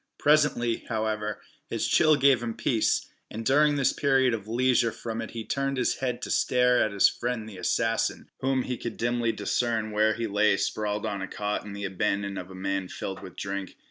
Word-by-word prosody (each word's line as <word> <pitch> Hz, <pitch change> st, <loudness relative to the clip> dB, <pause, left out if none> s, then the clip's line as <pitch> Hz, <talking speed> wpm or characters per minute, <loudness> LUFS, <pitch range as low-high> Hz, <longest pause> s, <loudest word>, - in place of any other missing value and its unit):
Presently, 145 Hz, -6 st, +3 dB
however, 110 Hz, -2 st, -2 dB, 0.3 s
his -, -, -1 dB
chill 155 Hz, -1 st, +5 dB
gave 135 Hz, -3 st, +4 dB
him 115 Hz, -1 st, -3 dB
peace, 115 Hz, -4 st, +1 dB, 0.2 s
and 115 Hz, +1 st, -6 dB
during 145 Hz, +3 st, +4 dB
this 140 Hz, -2 st, +2 dB
period 135 Hz, -3 st, +2 dB
of 105 Hz, -2 st, -4 dB
leisure 120 Hz, 0 st, +2 dB
from 115 Hz, +1 st, -5 dB
it 115 Hz, -, -6 dB
he 115 Hz, -1 st, -6 dB
turned 135 Hz, 0 st, -1 dB
his 125 Hz, -, +1 dB
head 125 Hz, -2 st, -3 dB
to -, -, -4 dB
stare 125 Hz, -1 st, +3 dB
at 110 Hz, -, -1 dB
his 100 Hz, -1 st, +5 dB
friend 120 Hz, -2 st, -3 dB
the 100 Hz, -4 st, -9 dB
assassin, 115 Hz, +3 st, 0 dB
whom 130 Hz, -1 st, +1 dB
he 125 Hz, -1 st, -3 dB
could 120 Hz, 0 st, -6 dB
dimly 120 Hz, -1 st, 0 dB
discern 115 Hz, -2 st, -1 dB
where 110 Hz, +1 st, +2 dB
he 115 Hz, -, -2 dB
lay 105 Hz, -1 st, +2 dB
sprawled 105 Hz, +1 st, -2 dB
on 100 Hz, -3 st, -3 dB
a 95 Hz, -, -3 dB
cot 105 Hz, +1 st, -3 dB
in 105 Hz, -, -8 dB
the 100 Hz, 0 st, -5 dB
abandon 100 Hz, +1 st, -1 dB
of 90 Hz, -, -8 dB
a 95 Hz, -, -10 dB
man 95 Hz, 0 st, -2 dB
filled 95 Hz, +1 st, -6 dB
with 95 Hz, -, -10 dB
drink. 100 Hz, -1 st, -5 dB
115 Hz, 205 wpm, -27 LUFS, 105-125 Hz, 0.3 s, chill